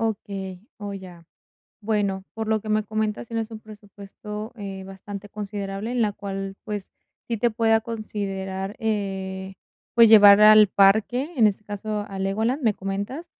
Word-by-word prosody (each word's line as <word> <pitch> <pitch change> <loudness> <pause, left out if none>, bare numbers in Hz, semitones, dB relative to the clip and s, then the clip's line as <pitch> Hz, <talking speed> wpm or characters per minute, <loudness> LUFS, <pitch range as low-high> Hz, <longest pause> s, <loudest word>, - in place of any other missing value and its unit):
Okey, 195 -4 -4 0.2
oh, 205 -1 -6
ya. 180 -3 -11 0.5
Bueno, 205 -3 -1
por 220 0 -4
lo 220 -1 +1
que 215 - -9
me 215 0 +1
comentas, 215 +1 -2
tienes 225 0 -3
un 220 - -7
presupuesto, 210 0 -9
eh, 195 -3 -7
bastante 200 +1 -9
considerable, 205 +1 -5
en 245 -1 +1
la 210 -2 +1
cual, 195 -1 -5
pues, 210 -3 -5 0.4
sí 230 - -2
te 235 +3 +1
pueda 225 0 +2
considerar, 200 -3 -5
eh, 195 -4 -3 0.4
pues, 230 -2 +7
llevar 205 -2 +9
al 215 -1 +8
parque, 220 - +3
en 220 -3 +6
este 205 +1 -5
caso, 210 0 -4
a 195 -1 -6
Legoland, 220 +8 0
me 220 -3 +2
comentas. 200 - -4
210 Hz, 155 wpm, -24 LUFS, 195-220 Hz, 0.5 s, llevar